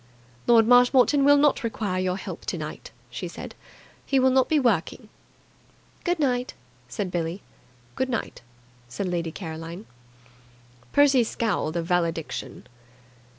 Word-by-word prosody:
"Lord 230 Hz, -2 st, +6 dB
Marshmoreton 250 Hz, +3 st, +5 dB
will 285 Hz, +1 st, +6 dB
not 285 Hz, -2 st, +3 dB
require 210 Hz, -5 st, -2 dB
your 185 Hz, 0 st, -1 dB
help -, -, -7 dB
tonight," -, -, -5 dB, 0.2 s
she -, -, -5 dB
said. -, -, -9 dB, 0.5 s
"He 275 Hz, -, 0 dB
will 260 Hz, 0 st, +4 dB
not 260 Hz, 0 st, +3 dB
be 310 Hz, -, +3 dB
working." 225 Hz, -, 0 dB, 0.9 s
"Good 350 Hz, 0 st, 0 dB
night," 250 Hz, -4 st, -1 dB, 0.3 s
said 180 Hz, +9 st, -4 dB
Billie. 175 Hz, +2 st, -3 dB, 0.5 s
"Good 260 Hz, -, -2 dB
night," 240 Hz, -, -4 dB, 0.5 s
said 185 Hz, +11 st, -4 dB
Lady 170 Hz, -2 st, -2 dB
Caroline. 165 Hz, +3 st, -7 dB, 1.1 s
Percy 280 Hz, -3 st, +5 dB
scowled 205 Hz, -8 st, -2 dB
a 170 Hz, -, -1 dB
valediction. 170 Hz, -2 st, -2 dB
225 Hz, 125 wpm, -25 LUFS, 175-260 Hz, 1.1 s, Lord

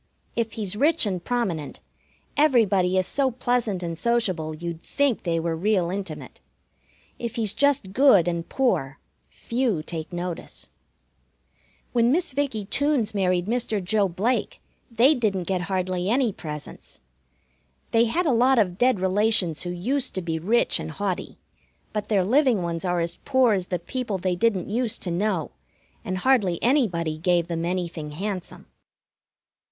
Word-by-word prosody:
If 230 Hz, -2 st, -1 dB
he's 205 Hz, -3 st, -3 dB
rich 300 Hz, +5 st, +3 dB
and 185 Hz, -4 st, -2 dB
prominent, 190 Hz, -, -2 dB, 0.6 s
everybody 205 Hz, -11 st, +3 dB
is 185 Hz, -, +2 dB
so 270 Hz, +7 st, +1 dB
pleasant 240 Hz, -6 st, -1 dB
and 170 Hz, -1 st, -3 dB
sociable 185 Hz, -8 st, 0 dB
you'd 170 Hz, 0 st, -6 dB
think 280 Hz, +1 st, 0 dB
they 165 Hz, -2 st, 0 dB
were 165 Hz, 0 st, -1 dB
real 180 Hz, 0 st, +1 dB
intimate. 195 Hz, 0 st, -6 dB, 0.8 s
If 235 Hz, 0 st, -4 dB
he's 220 Hz, -4 st, 0 dB
just 275 Hz, -9 st, +1 dB
good 220 Hz, -, +5 dB
and 170 Hz, -1 st, -2 dB
poor, 160 Hz, -, 0 dB, 0.3 s
few 230 Hz, -9 st, -1 dB
take 160 Hz, +1 st, -6 dB
notice. 175 Hz, -1 st, -6 dB, 1.2 s
When 235 Hz, 0 st, +3 dB
Miss 340 Hz, -1 st, 0 dB
Vickie 260 Hz, -7 st, -1 dB
Toones 285 Hz, -4 st, +1 dB
married 185 Hz, -3 st, +1 dB
Mr. 225 Hz, -1 st, -1 dB
Joe 200 Hz, +2 st, +2 dB
Blake 205 Hz, +9 st, -1 dB, 0.3 s
they 240 Hz, +5 st, +5 dB
didn't 210 Hz, -8 st, 0 dB
get 185 Hz, 0 st, -1 dB
hardly 185 Hz, -1 st, -1 dB
any 240 Hz, -2 st, +2 dB
presents. 150 Hz, -3 st, -8 dB, 0.9 s
They 230 Hz, +1 st, +4 dB
had 340 Hz, +11 st, 0 dB
a 300 Hz, -, +3 dB
lot 250 Hz, +3 st, +4 dB
of 185 Hz, -5 st, +1 dB
dead 250 Hz, -4 st, +3 dB
relations 190 Hz, -3 st, +2 dB
who 175 Hz, -, -4 dB
used 250 Hz, +10 st, -1 dB
to 185 Hz, -, -2 dB
be 165 Hz, -1 st, -2 dB
rich 220 Hz, +9 st, +1 dB
and -, -, -5 dB
haughty, 190 Hz, +2 st, -4 dB, 0.6 s
but 210 Hz, -1 st, -3 dB
their 195 Hz, -4 st, +2 dB
living 250 Hz, -3 st, +3 dB
ones 170 Hz, 0 st, -3 dB
are 175 Hz, -2 st, 0 dB
as 170 Hz, +1 st, -2 dB
poor 260 Hz, -4 st, +3 dB
as 185 Hz, -2 st, -1 dB
the 180 Hz, -, -1 dB
people 215 Hz, +4 st, -4 dB
they 185 Hz, 0 st, -1 dB
didn't 195 Hz, -1 st, +1 dB
used 230 Hz, +1 st, -2 dB
to 180 Hz, -, -2 dB
know, 180 Hz, -2 st, -1 dB, 0.5 s
and 185 Hz, -, -3 dB
hardly 200 Hz, -6 st, +2 dB
anybody 175 Hz, -, +1 dB
gave 175 Hz, 0 st, +2 dB
them 165 Hz, -1 st, -3 dB
anything 170 Hz, -4 st, -3 dB
handsome. 190 Hz, +2 st, -5 dB
195 Hz, 155 wpm, -24 LUFS, 175-240 Hz, 1.2 s, good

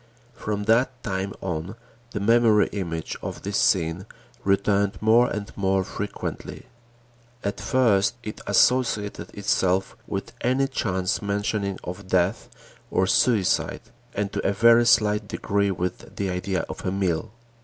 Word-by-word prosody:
From 105 Hz, -3 st, -3 dB
that 125 Hz, +4 st, +2 dB
time 95 Hz, -1 st, -2 dB
on, 90 Hz, +2 st, -4 dB, 0.3 s
the 100 Hz, -, -4 dB
memory 110 Hz, 0 st, +4 dB
image 85 Hz, -5 st, -4 dB
of -, -, -6 dB
this 100 Hz, 0 st, -1 dB
scene 85 Hz, +2 st, +1 dB, 0.4 s
returned 100 Hz, +1 st, +1 dB
more 115 Hz, +3 st, +4 dB
and 105 Hz, +1 st, -5 dB
more 95 Hz, -1 st, +1 dB
frequently. 100 Hz, +2 st, -6 dB, 0.8 s
At 100 Hz, +1 st, -3 dB
first 105 Hz, -2 st, +2 dB
it 105 Hz, -, -7 dB
associated 115 Hz, -5 st, +2 dB
itself 95 Hz, -2 st, +1 dB
with 100 Hz, +3 st, -4 dB
any 130 Hz, +3 st, +2 dB
chance 95 Hz, -8 st, -1 dB
mentioning 100 Hz, -1 st, -1 dB
of 90 Hz, +2 st, -7 dB
death 95 Hz, +2 st, +1 dB, 0.4 s
or 95 Hz, -, +2 dB
suicide 100 Hz, -1 st, +2 dB, 0.3 s
and 100 Hz, 0 st, -2 dB
to -, -, -2 dB
a 100 Hz, -, +1 dB
very 115 Hz, +3 st, +5 dB
slight 105 Hz, -2 st, +3 dB
degree 100 Hz, 0 st, 0 dB
with 90 Hz, -1 st, -4 dB
the 100 Hz, -1 st, -2 dB
idea 90 Hz, +1 st, -2 dB
of -, -, -8 dB
a 90 Hz, -, -1 dB
meal. 95 Hz, +1 st, -1 dB
100 Hz, 135 wpm, -24 LUFS, 95-110 Hz, 0.8 s, very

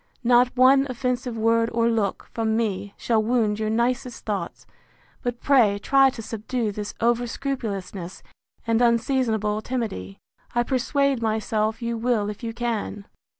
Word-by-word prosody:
—Not 245 Hz, +1 st, +4 dB
one 270 Hz, +2 st, +6 dB
offensive 250 Hz, -1 st, -2 dB
word 230 Hz, +1 st, +2 dB
or 230 Hz, 0 st, +2 dB
look, 220 Hz, -4 st, -1 dB
from 220 Hz, -1 st, 0 dB
me, 205 Hz, -3 st, -2 dB
shall 225 Hz, -2 st, +1 dB
wound 215 Hz, -2 st, +1 dB
your 215 Hz, 0 st, -1 dB
nicest 240 Hz, +2 st, -1 dB
thoughts; 210 Hz, -2 st, -4 dB, 0.6 s
but 245 Hz, -1 st, -3 dB
pray 235 Hz, -8 st, +4 dB
try 270 Hz, +6 st, +4 dB
to 230 Hz, -3 st, -8 dB
subdue 225 Hz, +1 st, -3 dB
this 205 Hz, 0 st, -6 dB
over 240 Hz, +1 st, +2 dB
scrupulousness, 200 Hz, -9 st, -5 dB, 0.4 s
and 230 Hz, 0 st, +2 dB
unseasonable 230 Hz, -3 st, +1 dB
timidity. 215 Hz, -, -4 dB, 0.4 s
I 240 Hz, -, +3 dB
persuade 270 Hz, +1 st, +1 dB
myself 220 Hz, 0 st, -1 dB
you 235 Hz, -1 st, -2 dB
will 225 Hz, -3 st, +1 dB
if 210 Hz, -, -11 dB
you 230 Hz, -1 st, -3 dB
can. 225 Hz, -3 st, -3 dB
230 Hz, 145 wpm, -24 LUFS, 215-245 Hz, 0.6 s, one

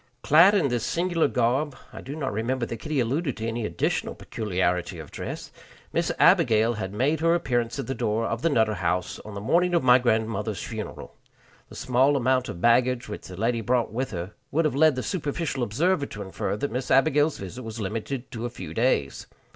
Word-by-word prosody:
Clad 170 Hz, +7 st, +6 dB
in 170 Hz, -9 st, +2 dB
this 120 Hz, -2 st, -1 dB
singular 170 Hz, -2 st, +1 dB
garb 130 Hz, +3 st, 0 dB, 0.2 s
I -, -, -8 dB
do 140 Hz, +3 st, -7 dB
not 135 Hz, -8 st, -3 dB
remember 120 Hz, +4 st, -1 dB
that 115 Hz, -, -5 dB
Kitty 150 Hz, +6 st, -2 dB
alluded 135 Hz, +4 st, -1 dB
to 110 Hz, -, -4 dB
any 115 Hz, -1 st, -2 dB
additional -, -, -1 dB
peculiarity 90 Hz, -4 st, -2 dB
of 80 Hz, -3 st, -10 dB
dress -, -, -6 dB, 0.4 s
Miss -, -, +1 dB
Abigail 115 Hz, 0 st, +4 dB
had 95 Hz, -4 st, -4 dB
made 135 Hz, +9 st, +1 dB
her 165 Hz, +1 st, +3 dB
appearance 120 Hz, -7 st, -1 dB
at 135 Hz, -, -3 dB
the 135 Hz, -, -3 dB
door 110 Hz, -2 st, -1 dB
of 115 Hz, +1 st, -2 dB
the 165 Hz, -, +2 dB
Nutter 110 Hz, -6 st, +2 dB
House 90 Hz, -1 st, -2 dB
on 105 Hz, -1 st, -10 dB
the -, -, -4 dB
morning 175 Hz, -, +2 dB
of 170 Hz, -, +2 dB
my 125 Hz, 0 st, +6 dB
grandmother's 110 Hz, -3 st, -1 dB
funeral. 110 Hz, -2 st, -7 dB, 0.6 s
The -, -, -12 dB
small 130 Hz, +3 st, +2 dB
amount 130 Hz, 0 st, +1 dB
of 85 Hz, -, -6 dB
baggage 120 Hz, +3 st, +3 dB
which 105 Hz, -, -7 dB
the 90 Hz, -, -9 dB
lady 115 Hz, +2 st, 0 dB
brought 120 Hz, +1 st, 0 dB
with 130 Hz, +3 st, -2 dB
her 90 Hz, +1 st, -6 dB, 0.2 s
would 160 Hz, +3 st, +1 dB
have 155 Hz, -, +1 dB
led 155 Hz, +1 st, +4 dB
the 130 Hz, -, -3 dB
superficial 150 Hz, -5 st, -2 dB
observer 140 Hz, -, +1 dB
to 105 Hz, -, -7 dB
infer 95 Hz, +1 st, -3 dB
that 140 Hz, +4 st, -3 dB
Miss 125 Hz, +2 st, -3 dB
Abigail's 145 Hz, +3 st, +3 dB
visit 95 Hz, +6 st, -7 dB
was 115 Hz, -1 st, -7 dB
limited 115 Hz, +5 st, -4 dB
to 120 Hz, 0 st, -4 dB
a -, -, -6 dB
few 90 Hz, -9 st, -8 dB
days. 110 Hz, -, 0 dB
120 Hz, 205 wpm, -25 LUFS, 110-140 Hz, 0.6 s, Clad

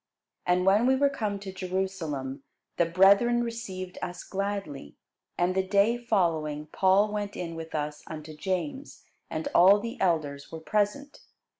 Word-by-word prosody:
And 180 Hz, +1 st, +2 dB
when 205 Hz, +5 st, +4 dB
we 265 Hz, -, +4 dB
were 280 Hz, +1 st, +3 dB
come 215 Hz, -7 st, -2 dB
to 195 Hz, -2 st, -7 dB
Jerusalem, 180 Hz, -8 st, -3 dB, 0.4 s
the 170 Hz, -, +3 dB
brethren 200 Hz, +7 st, +5 dB
received 195 Hz, -6 st, -6 dB
us 180 Hz, 0 st, -5 dB
gladly. 195 Hz, -, -4 dB, 0.4 s
And 175 Hz, +1 st, +2 dB
the 190 Hz, -, +2 dB
day 200 Hz, +4 st, +3 dB
following 165 Hz, -10 st, 0 dB
Paul 195 Hz, +2 st, +3 dB
went 205 Hz, -1 st, -3 dB
in 170 Hz, -2 st, -4 dB
with 165 Hz, -1 st, -7 dB
us 150 Hz, 0 st, -3 dB
unto 155 Hz, -1 st, -8 dB
James; 200 Hz, -, -4 dB, 0.3 s
and 155 Hz, 0 st, -3 dB
all 195 Hz, +4 st, +7 dB
the 230 Hz, +4 st, -6 dB
elders 155 Hz, -6 st, 0 dB
were 165 Hz, -, -6 dB
present. 210 Hz, -, -1 dB
190 Hz, 150 wpm, -28 LUFS, 165-210 Hz, 0.4 s, all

